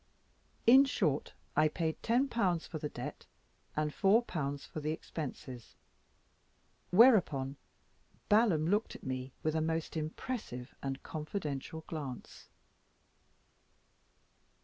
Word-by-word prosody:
In 260 +4 +9
short, 160 - 0 0.2
I 155 +1 +5
paid 160 0 -2
10*l.* 230 -7 +2
for 160 - -5
the 150 - -3
debt, - - -7 0.5
and 150 0 0
4*l.* 185 - +2
for 150 - -8
the 155 0 -2
expenses: 130 -6 -6 1.1
whereupon 180 - +5 0.7
Balaam 205 -8 +4
looked 210 +5 +1
at - - -11
me 130 0 -4
with 155 - +1
a 160 - +1
most 160 +1 -1
impressive 155 - -4
and 135 0 -4
confidential 155 -2 -4
glance. 140 -6 -7
155 Hz, 100 wpm, -33 LUFS, 140-200 Hz, 1.1 s, In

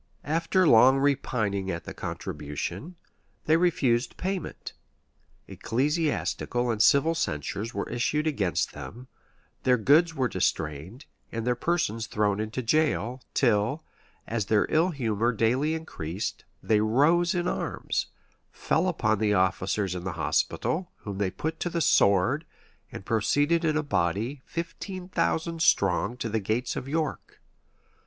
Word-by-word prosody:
After 165 +4 +2
long 130 +3 +7
repining 120 -8 0
at 85 -2 -3
the - - -8
contribution, 85 - -5 0.5
they 155 - +4
refused 135 -8 +1
payment: 190 -2 -4 0.7
ecclesiastical 135 -3 -1
and 110 -2 -1
civil 140 +7 +5
censures 105 - -3
were - - -2
issued 150 +6 -1
against 105 - 0
them, 125 +3 -9 0.5
their 125 -1 +3
goods 160 +8 +4
were 130 -3 +1
distrained, 90 - -2 0.3
and 115 0 -4
their 125 - +2
persons 120 -6 -1
thrown 105 -1 0
into 110 +4 -3
jail: 130 -2 +1
till, 120 +5 +2 0.4
as 110 -3 -2
their 105 -2 +3
ill 165 +4 +3
humor 120 - 0
daily 125 +7 +1
increased, 95 - -5 0.2
they 105 -1 +3
rose 155 - +3
in 175 0 0
arms; - - -2 0.4
fell 165 +4 0
upon 110 - +1
the 105 -1 +2
officers 95 +1 0
of 90 -1 -5
the 95 -1 -3
hospital, 175 - -1
whom 100 -2 -6
they 100 -2 +1
put 160 - -4
to 175 - -1
the 170 - -2
sword; 100 - +3 0.5
and 95 - -8
proceeded 145 - +2
in 155 -2 +1
a 155 - 0
body, 115 - -1
fifteen 180 +2 -6
thousand 165 -2 -1
strong, 100 - +2
to 115 - -3
the 110 0 -1
gates 110 +5 -2
of 130 - -5
York. 155 +1 -3
125 Hz, 135 wpm, -27 LUFS, 105-160 Hz, 0.7 s, long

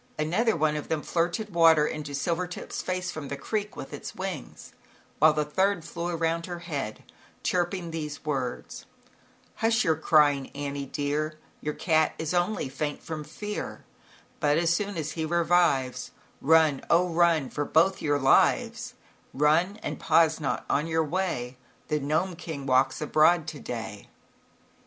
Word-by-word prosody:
Another 180 +9 +1
one 155 -1 +1
of 150 - -4
them 160 -2 -2
flirted 175 +5 -1
water 165 -3 +6
into 150 -2 -4
Silvertip's 175 +5 -3
face 185 0 -2
from 155 -3 -6
the 140 - -5
creek 210 +6 -3
with 135 - -8
its 145 - -7
wings, 185 -6 -6 0.5
while 155 +1 +7
the 150 0 0
third 190 +3 0
flew 170 0 -4
around 165 0 -1
her 175 -1 -5
head, 145 -11 -5 0.4
chirping 175 -1 -1
these 150 -2 -5
words: 135 -5 -4 0.2
u - - -32 0.4
Hush 225 +1 +2
your 160 - +2
crying 145 -3 +3
Annie 140 -1 -4
dear, 150 +3 -2 0.2
Your 150 0 -3
cat 160 -2 +2
is 160 +1 -3
only 175 -1 0
faint 145 +2 -4
from 155 -2 -5
fear, 210 +7 -6 0.5
But 150 -1 +2
as 170 0 +2
soon 200 +1 -2
as 155 -1 -3
he 160 0 -3
revives, 165 -5 +2 0.3
Run, 155 -2 +4
oh 180 +2 +4
run, 165 -5 +3
for 145 - -2
both 170 +6 +2
your 145 -2 +1
lives, 135 -1 +2 0.4
Run, 160 +8 +3
and - - -4
pause 160 -1 +3
not 140 -4 -2
on 150 +3 +1
your 160 0 +1
way. 150 -8 -2 0.3
The 150 - +1
Gnome 155 +6 0
King 160 -4 -6
walks 130 +2 +2
abroad 155 +2 +4
to 155 -2 -8
day." 110 -5 -6
160 Hz, 155 wpm, -27 LUFS, 145-175 Hz, 0.5 s, while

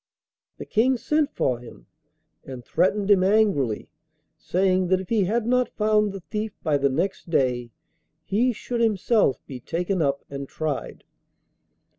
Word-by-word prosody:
The - - -7
King 250 +4 +2
sent 300 +4 +1
for 125 -2 0
him, 115 - -13 0.6
and 130 -3 -9
threatened 200 +2 +1
him 190 -2 +5
angrily, 190 - +2 0.5
saying 185 +2 +1
that 185 +1 +2
if 190 - -8
he 215 -4 +2
had 220 +4 0
not 250 +1 +2
found 210 -1 +2
the 195 -1 -8
thief 210 +4 -5
by 150 -3 +1
the 140 0 +2
next 170 +6 -2
day, 125 -6 +1 0.5
he 235 +6 +1
should 240 +1 -4
himself 215 - +2
be 130 -3 -8
taken 175 - -2
up 140 -2 0
and 140 -1 -7
tried. 155 -3 -4
190 Hz, 150 wpm, -24 LUFS, 140-215 Hz, 0.6 s, him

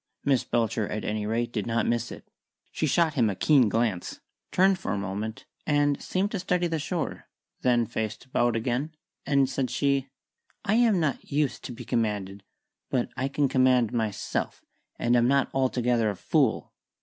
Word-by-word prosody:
Miss 135 -3 +3
Belcher, 115 -3 0
at 105 - -4
any 105 0 -2
rate, 115 +2 -1
did 105 -2 -2
not 115 0 +1
miss 120 0 -1
it. - - -10 0.4
She 155 - -1
shot 160 +2 +2
him 120 -6 +2
a 100 - -2
keen 130 0 +4
glance, 110 -5 -1 0.3
turned 190 0 +4
for - - -3
a - - -1
moment, 100 +3 -4 0.2
and 145 -1 +2
seemed 195 +3 -1
to 200 - -2
study 180 -1 0
the 165 -2 -1
shore, 165 +2 -3 0.4
then 120 -2 +3
faced 110 +1 -4
about 120 -2 +1
again, 125 +7 -2 0.3
and 140 -2 +3
said 130 -1 -2
she 140 +1 +1 0.6
"I 200 - +2
am 225 -4 +4
not 155 -5 -2
used 145 0 0
to - - -5
be 120 - -9
commanded. 100 -3 -1 0.5
But 125 -2 0
I 130 +2 -1
can 140 +1 +1
command 130 -3 +3
myself, 110 -4 -2 0.3
and 120 +1 +2
am 120 0 +4
not 140 +1 +2
altogether 125 -4 +1
a 100 - -3
fool." - - 0
125 Hz, 175 wpm, -27 LUFS, 110-145 Hz, 0.6 s, keen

